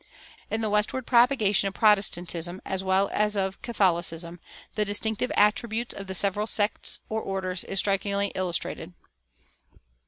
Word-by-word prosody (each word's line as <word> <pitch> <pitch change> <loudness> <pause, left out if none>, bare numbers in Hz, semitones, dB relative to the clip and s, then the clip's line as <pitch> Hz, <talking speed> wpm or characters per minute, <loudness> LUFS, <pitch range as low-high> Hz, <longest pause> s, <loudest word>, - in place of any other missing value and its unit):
In 220 - -2
the 220 - 0
westward 210 +4 0
propagation 235 -5 +3
of 195 - -6
Protestantism, 180 -4 +2
as 190 0 -3
well 190 +1 +2
as 210 0 +1
of 190 -1 -2
Catholicism, 175 -7 0 0.3
the 215 - 0
distinctive 220 +3 -1
attributes 220 +3 +1
of 195 - -8
the 190 - -4
several 205 +3 0
sects 210 -1 +1
or 220 0 -3
orders 190 -2 -3
is 195 - -4
strikingly 200 0 +1
illustrated. 180 -2 -3
200 Hz, 135 wpm, -26 LUFS, 190-215 Hz, 0.3 s, propagation